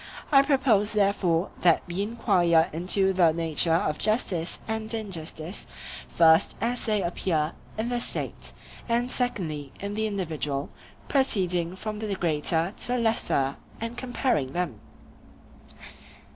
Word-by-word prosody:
I 275 -2 +8
propose 260 -8 +2
therefore 195 -4 +1
that 170 -3 +4
we 175 +3 -3
enquire 185 -7 +2
into 190 +3 +3
the 175 -3 +4
nature 165 0 +2
of 155 -2 0
justice 190 -6 0
and 220 0 -3
injustice, 180 -5 -5 0.4
first 160 - +4
as 240 +1 -1
they 210 -3 +1
appear 170 -2 -1 0.2
in 225 +2 -1
the 245 -1 -1
State, - - -3 0.4
and 240 +2 +1
secondly 160 - -2
in 200 +1 -4
the 220 +1 0
individual, 155 -8 -3 0.4
proceeding 185 - +1
from 215 +2 -5
the 210 -2 -2
greater 165 +1 0
to - - -1
the 250 +1 0
lesser 220 - 0 0.2
and 230 +1 -4
comparing 245 - -1
them. 175 -11 -2
190 Hz, 130 wpm, -26 LUFS, 165-220 Hz, 0.4 s, I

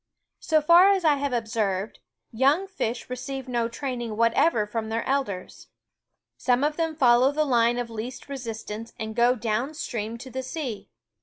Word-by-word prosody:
So 310 -1 +2
far 340 +5 +7
as 385 -3 +2
I 295 -2 +4
have 280 0 -2
observed, 220 -4 -2 0.3
young 275 +10 +3
fish 245 - -3
receive 260 +1 -5
no 240 -2 0
teaching 240 -2 -4
whatever 230 +1 +3
from 220 +1 -4
their 225 +1 -1
elders. 260 -10 -3 0.7
Some 250 +1 +1
of 300 +1 +1
them 325 -1 -1
follow 250 -1 +5
the 305 +1 +1
line 240 -3 +3
of 245 - -1
THE 230 - -13
WOODS 215 - -3
O - - -5
least 250 +1 -9
resistance 230 -4 -6
and 220 0 -5
go 240 +1 +4
down 240 +5 -2
stream 225 -5 -4
to 260 +2 -10
the 260 - -3
sea. 260 -5 -5
245 Hz, 180 wpm, -25 LUFS, 225-280 Hz, 0.7 s, far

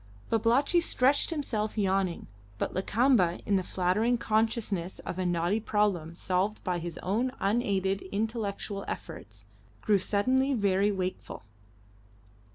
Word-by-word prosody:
Babalatchi 240 +9 +3
stretched 285 -4 +2
himself 230 -10 -2
yawning, 190 -3 0 0.3
but - - -2
Lakamba, 195 -2 +2
in 200 - +2
the 190 - +2
flattering 190 +7 +1
consciousness 215 -5 0
of 180 - -6
a 185 - 0
knotty 175 +4 +1
problem 205 -7 0
solved 185 +4 -1
by 180 -2 -1
his 170 -1 -6
own 230 +7 0
unaided 195 -2 0
intellectual 205 -2 -3
efforts, - - -8 0.4
grew 205 -2 +3
suddenly 260 +8 +1
very 200 -1 +2
wakeful. 185 - -4
205 Hz, 120 wpm, -29 LUFS, 185-230 Hz, 0.4 s, Babalatchi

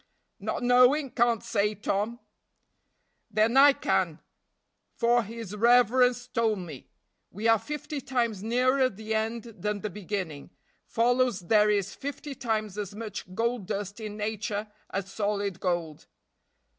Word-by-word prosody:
"Not - - -3
knowing, 250 +3 +4
can't 235 -2 +2
say, 210 +1 0
Tom." 210 +3 -2 1.1
"Then 220 +3 +2
I 280 +1 +8
can, 280 - 0 0.8
for 240 0 +3
his 225 -2 -7
reverence 245 +2 +4
told 225 -3 +1
me. 165 -8 -9 0.4
We 210 +5 -3
are 225 -1 +5
fifty 295 +4 -5
times 235 -6 -1
nearer 255 +4 +2
the 220 +1 -5
end 220 +1 -1
than 210 -3 -4
the 215 - -4
beginning, 185 -6 -5 0.4
follows 245 -2 +2
there 210 +4 +4
is 200 -3 0
fifty 285 +1 -6
times 215 -6 -2
as 205 -1 -5
much 210 -4 -7
gold 230 -3 -1
dust 200 +1 -4
in 210 -1 -6
nature 210 0 -3 0.2
as 195 0 -4
solid 200 -3 -1
gold." 170 -4 -2
220 Hz, 130 wpm, -28 LUFS, 205-245 Hz, 1.1 s, I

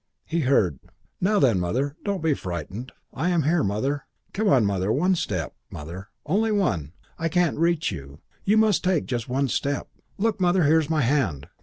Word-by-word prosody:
He 170 - -1
heard, 105 - +2 0.4
"Now 205 +3 +3
then, 120 - +4
Mother! 130 +11 -1
Don't 200 -5 -2
be 160 -2 +3
frightened. 95 - -5 0.2
Here - - -5
I 175 - +2
am, 170 -3 +2 0.2
Mother. 135 +8 -2 0.3
Come 215 +2 0
on, 125 -6 +5
Mother. 100 0 0
One 180 +10 +2
step, 90 - -2 0.2
Mother. 85 +7 -8 0.2
Only 210 +8 +1
one. 95 - 0 0.3
I 165 0 0
can't 175 -4 +1
reach 165 -3 +2
you. 70 -5 -8 0.3
You 210 +2 +3
must 215 -3 +3
take 180 -4 +1
just 120 -2 -3
one 135 +2 +1
step. 140 +3 -2 0.3
Look, 220 -1 0
Mother, 180 0 +3
here's 155 +1 +3
my 160 -2 +2
hand. 115 - 0
140 Hz, 180 wpm, -25 LUFS, -, 0.4 s, on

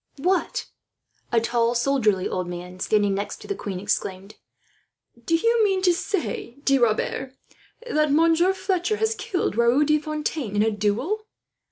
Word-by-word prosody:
"What!" 365 - 0 0.7
A 235 - +4
tall 235 +1 +1
soldierly 235 -7 +2
old 185 -1 -3
man, 180 +1 -7
standing 205 0 +2
next 200 +1 -4
to - - -10
the 400 - -1
queen, 195 - -5
exclaimed. 195 0 -3 0.9
"Do 330 - +2
you 460 +6 +3
mean 385 -2 +1
to 360 -2 +5
say, 340 - -3
De 275 -1 +4
Rebers, 240 +3 0 0.5
that 305 -8 +1
Monsieur 330 +4 +4
Fletcher 380 +1 -1
has 445 +1 +1
killed 360 - -2
Raoul 235 +5 +4
de 305 +1 +3
Fontaine 300 -7 -3
in 205 - +3
a 220 - +2
duel? 235 - -1
275 Hz, 155 wpm, -24 LUFS, -, 0.9 s, to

